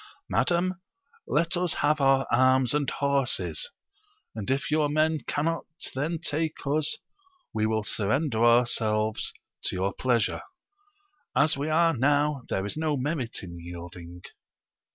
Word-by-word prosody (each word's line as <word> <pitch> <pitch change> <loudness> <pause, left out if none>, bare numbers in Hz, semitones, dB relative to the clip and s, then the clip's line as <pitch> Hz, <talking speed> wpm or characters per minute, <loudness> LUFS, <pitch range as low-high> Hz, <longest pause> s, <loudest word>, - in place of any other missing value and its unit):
Madam, 175 +5 +1 0.5
let 170 +4 +1
us 175 -1 +1
have 150 0 +2
our 135 0 +4
arms 130 +1 +4
and 145 -2 +1
horses, 140 - 0 0.6
and 105 -3 -5
if 135 +2 0
your 150 -1 +2
men 155 +1 +2
cannot 165 +3 -1 0.3
then 155 +6 -1
take 160 0 -2
us, 150 +2 +1 0.6
we 110 0 +1
will 110 -1 0
surrender 110 +4 0
ourselves 110 -2 +2 0.3
to - - -2
your 95 +1 0
pleasure; 120 -5 +1 0.9
as 155 +2 +4
we 145 +3 -2
are 165 +1 +3
now, 145 +2 +2
there 95 - -1
is 105 - -4
no 155 -2 0
merit 130 -5 -2
in 85 -2 -8
yielding. 85 0 -9
140 Hz, 130 wpm, -27 LUFS, 110-155 Hz, 0.9 s, our